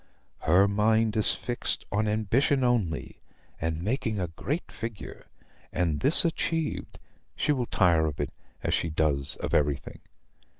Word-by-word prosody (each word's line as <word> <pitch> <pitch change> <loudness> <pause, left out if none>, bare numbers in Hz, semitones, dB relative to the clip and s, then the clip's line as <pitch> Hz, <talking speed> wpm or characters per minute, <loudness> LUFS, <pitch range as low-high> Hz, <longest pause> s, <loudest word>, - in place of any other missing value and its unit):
Her 95 +5 +4
mind 110 +2 +2
is 110 - +7
fixed 120 -1 -2
on 105 +2 +1
ambition 115 +6 +1
only, 115 -10 -1 0.4
and 80 +1 -2
making 110 -1 -1
a 90 -3 -2
great 145 - -4
figure; 115 -2 -8 0.4
and, 80 -4 0
this 150 +5 +3
achieved, 165 -1 -2 0.4
she 150 - +1
will 125 -5 0
tire 85 -4 +3
of 75 -1 -5
it 70 - -2 0.3
as - - 0
she 80 - 0
does 75 -3 +1
of - - -5
everything. 70 -2 0
105 Hz, 140 wpm, -27 LUFS, 80-120 Hz, 0.4 s, is